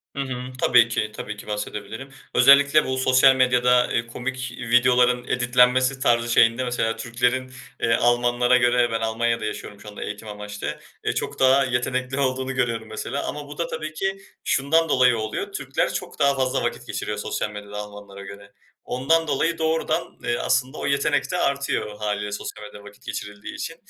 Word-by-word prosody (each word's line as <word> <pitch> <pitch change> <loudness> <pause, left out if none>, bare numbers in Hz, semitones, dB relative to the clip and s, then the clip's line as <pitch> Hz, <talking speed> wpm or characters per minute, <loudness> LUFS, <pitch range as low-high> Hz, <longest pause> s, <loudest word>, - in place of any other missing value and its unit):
Hı 140 - -5
hı. 125 -2 -5 0.2
Tabii 120 -2 +5
ki, 105 -2 -1
tabii 105 -1 -6
ki - - -12
bahsedebilirim. 105 +4 -5 0.3
Özellikle 140 +4 +6
bu 130 0 -2
sosyal 130 +1 +5
medyada, 125 -1 +3
eee, 115 0 0
komik 130 +2 -5
videoların 125 0 +3
editlenmesi 125 +1 +3
tarzı 120 -2 +2
şeyinde 115 +2 +4
mesela 120 -2 -1
Türklerin, 125 +2 -1 0.3
eee, 115 -1 +2
Almanlara 120 +1 +3
göre, 120 -1 +3
ben 115 0 -1
Almanya'da 115 0 0
yaşıyorum 105 -1 -6
şu - - -13
anda 105 - -7
eğitim 105 +1 -7
amaçlı, 105 0 -6 0.3
eee, - - 0
çok - - -4
daha 135 +1 +5
yetenekli 130 +1 -2
olduğunu 130 0 -1
görüyorum 115 -3 -1
mesela. 125 +5 -4
Ama 145 -1 -6
bu 145 - -10
da 170 -1 -1
tabii 155 -1 -5
ki 195 +4 -2 0.3
şundan 160 +4 +2
dolayı 125 -4 +4
oluyor, 110 0 -4
Türkler - - -2
çok - - -6
daha 140 0 +3
fazla 130 0 0
vakit - - -3
geçiriyor - - -4
sosyal 105 - -3
medyada 105 0 -8
Almanlara 105 -1 -9
göre. 100 0 -11 0.4
Ondan 160 +6 +1
dolayı 160 +4 0
doğrudan, 160 0 -1
eee, 120 - 0
aslında 130 +3 0
o - - -4
yetenek 140 +5 +1
de 180 - -1
artıyor 140 -8 -1
hâliyle 105 -1 -2
sosyal 105 +1 -6
medyada 105 -1 -11
vakit 105 0 -15
geçirildiği 105 0 -7
için 165 - -5
125 Hz, 175 wpm, -23 LUFS, 110-130 Hz, 0.4 s, Özellikle